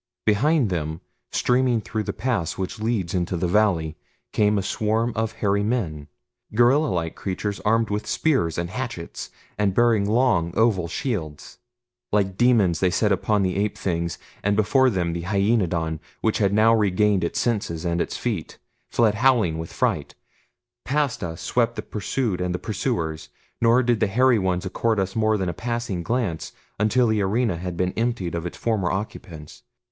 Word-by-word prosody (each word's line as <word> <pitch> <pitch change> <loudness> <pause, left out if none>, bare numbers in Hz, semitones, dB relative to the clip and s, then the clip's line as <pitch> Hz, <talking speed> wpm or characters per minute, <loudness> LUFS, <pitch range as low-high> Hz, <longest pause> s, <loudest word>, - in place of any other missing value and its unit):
Behind 120 - +3
them, 80 -2 -2 0.3
streaming 125 -1 +2
through 110 0 -3
the - - -3
pass 105 -7 -2
which 95 +2 -4
leads 110 -6 -1
into 90 -1 -1
the 90 - 0
valley, 85 -5 +2 0.4
came 105 0 +3
a 100 - 0
swarm 110 +4 0
of 110 0 -1
hairy 100 -2 0
men 95 -10 -2 0.5
gorilla 130 +7 +4
like 85 - -2
creatures 100 +1 -3
armed 110 0 +1
with 105 +1 -2
spears 130 - +1
and 85 +1 -3
hatchets, 115 -8 -5 0.3
and 100 -2 +1
bearing 115 -4 +3
long, 105 -8 +2
oval 105 -7 +2
shields. 85 - -4 0.5
Like 100 -2 +1
demons 110 -8 +3
they 95 - +3
set 105 +3 +1
upon 100 +2 +1
the 90 -1 0
ape 105 +1 -1
things, 85 -3 -2 0.2
and 105 0 +1
before 130 +6 +4
them 90 -6 -1
the 85 - -3
hyaenodon, 90 -5 +1 0.2
which 110 - +1
had 100 -2 +2
now 110 +2 +5
regained 105 -2 +2
its 85 - -2
senses 100 -8 -1
and 85 0 0
its - - -3
feet, - - -3 0.3
fled 115 -3 +3
howling 110 -8 +2
with 80 - -6
fright. - - -1 0.7
Past 135 -5 -1
us 80 -1 -5
swept 115 +8 +1
the - - -5
pursued 105 -1 -2
and 90 0 -1
the - - -1
pursuers, 95 -7 -3 0.3
nor 120 +2 +4
did 120 -2 +1
the 110 - +2
hairy 125 +3 +3
ones 95 -1 -1
accord 110 +3 0
us 95 0 -2
more 110 -1 +2
than 95 -2 -2
a 85 - -2
passing 115 -4 -3
glance 105 -6 -2 0.3
until 115 +4 +3
the 110 -2 +1
arena 105 -1 +1
had 90 0 -5
been 90 +1 0
emptied 115 -7 -1
of 85 0 -3
its - - -8
former 105 -6 0
occupants. 95 -6 -6
105 Hz, 175 wpm, -24 LUFS, 90-115 Hz, 0.7 s, now